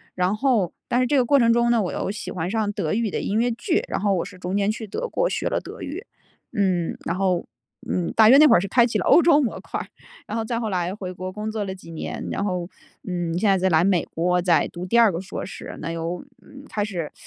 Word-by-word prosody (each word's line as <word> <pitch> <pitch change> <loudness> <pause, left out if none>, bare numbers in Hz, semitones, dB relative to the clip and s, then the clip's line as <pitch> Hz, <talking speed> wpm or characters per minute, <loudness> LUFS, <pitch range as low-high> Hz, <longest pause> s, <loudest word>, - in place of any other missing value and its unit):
然 180 +3 +1
后 225 -8 +1 0.2
但 245 - +1
是 250 - +2
这 285 - +2
个 250 - +3
过 280 +3 +4
程 230 -1 +4
中 235 0 +3
呢， 230 -2 +3
我 180 - -2
又 - - -2
喜 210 - -6
欢 175 0 -3
上 215 -2 0
德 155 - -2
语 225 -1 0
的 - - -2
音 215 +2 0
乐 245 +1 +2
剧， 240 - 0
然 - - -2
后 200 -1 +1
我 175 - 0
是 185 -1 -11
中 180 +2 -4
间 200 +1 +1
去 220 0 -6
德 485 - -3
国 - - +1
学 - - -2
了 - - 0
德 - - -10
语。 345 - -6 0.5
嗯， 185 -4 0
然 170 - -1
后， 185 -3 +1 0.4
嗯， 180 -2 -1
大 220 -1 +7
约 270 - +9
那 305 - +8
会 - - +6
儿 - - +3
是 200 - -3
开 240 +4 +4
启 225 -3 -1
了 - - -2
欧 340 - +7
洲 330 -4 +6
模 245 - -2
块， - - -5 0.5
然 210 - -4
后 225 - -1
再 230 0 -2
后 220 -2 -2
来 180 -1 -1
回 185 -3 -6
国 185 +1 -6
工 210 +2 -5
作 215 -2 -2
了 190 -1 -4
几 175 -3 -13
年， 160 - -5
然 200 - -2
后， 180 -3 -2 0.4
嗯， 175 -2 -2
现 210 - +1
在 195 - +5
再 190 - +2
来 160 0 +4
美 185 -3 +2
国 180 +2 0
再 175 -1 +3
读 175 +1 -7
第 235 - +2
2 225 -4 +6
个 165 - -3
硕 190 - -6
士， - - -8
那 165 +1 -4
又 165 +4 -4 0.4
开 210 -6 -2
始， 175 -7 -4
200 Hz, 285 characters per minute, -23 LUFS, 180-230 Hz, 0.5 s, 约